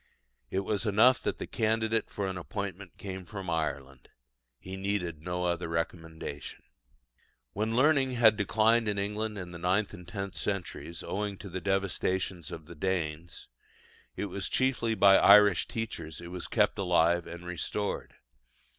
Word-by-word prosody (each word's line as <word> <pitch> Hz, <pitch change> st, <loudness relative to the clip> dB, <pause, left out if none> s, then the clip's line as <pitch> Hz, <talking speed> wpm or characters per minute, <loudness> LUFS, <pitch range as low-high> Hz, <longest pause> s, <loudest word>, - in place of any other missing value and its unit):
It 95 Hz, -, 0 dB
was 105 Hz, +3 st, -1 dB
enough 115 Hz, +5 st, +5 dB
that -, -, -2 dB
the -, -, -4 dB
candidate 110 Hz, 0 st, 0 dB
for 100 Hz, -, -3 dB
an 95 Hz, -1 st, -3 dB
appointment 95 Hz, 0 st, -6 dB
came 95 Hz, -2 st, -6 dB
from 95 Hz, -1 st, -6 dB
Ireland: 70 Hz, -5 st, -3 dB, 0.5 s
he 95 Hz, +8 st, -8 dB
needed 95 Hz, -5 st, -2 dB
no 90 Hz, +1 st, -3 dB
other 85 Hz, 0 st, -1 dB
recommendation. 80 Hz, -3 st, -5 dB, 0.9 s
When 110 Hz, +3 st, -1 dB
learning 135 Hz, 0 st, +4 dB
had 110 Hz, -3 st, +6 dB
declined 110 Hz, +2 st, +3 dB
in 105 Hz, -1 st, 0 dB
England 105 Hz, +2 st, -2 dB
in 90 Hz, -2 st, -6 dB
the 85 Hz, -, -8 dB
ninth 95 Hz, +5 st, +1 dB
and 90 Hz, -3 st, -11 dB
tenth 95 Hz, 0 st, -5 dB
centuries, 90 Hz, -3 st, -4 dB
owing 100 Hz, 0 st, -3 dB
to 100 Hz, -, -9 dB
the 90 Hz, +1 st, -5 dB
devastations 95 Hz, -2 st, -1 dB
of 80 Hz, -, -8 dB
the 85 Hz, -, -10 dB
Danes, 85 Hz, -1 st, -3 dB, 0.7 s
it -, -, -2 dB
was 100 Hz, 0 st, -3 dB
chiefly 125 Hz, -4 st, +1 dB
by 100 Hz, -2 st, +7 dB
Irish 100 Hz, -2 st, +7 dB
teachers 85 Hz, -9 st, -5 dB
it 85 Hz, 0 st, -8 dB
was 90 Hz, -1 st, -5 dB
kept 105 Hz, -1 st, +2 dB
alive 85 Hz, -2 st, +3 dB
and 85 Hz, +1 st, -8 dB
restored. 90 Hz, +4 st, -3 dB
95 Hz, 155 wpm, -30 LUFS, 85-105 Hz, 0.9 s, by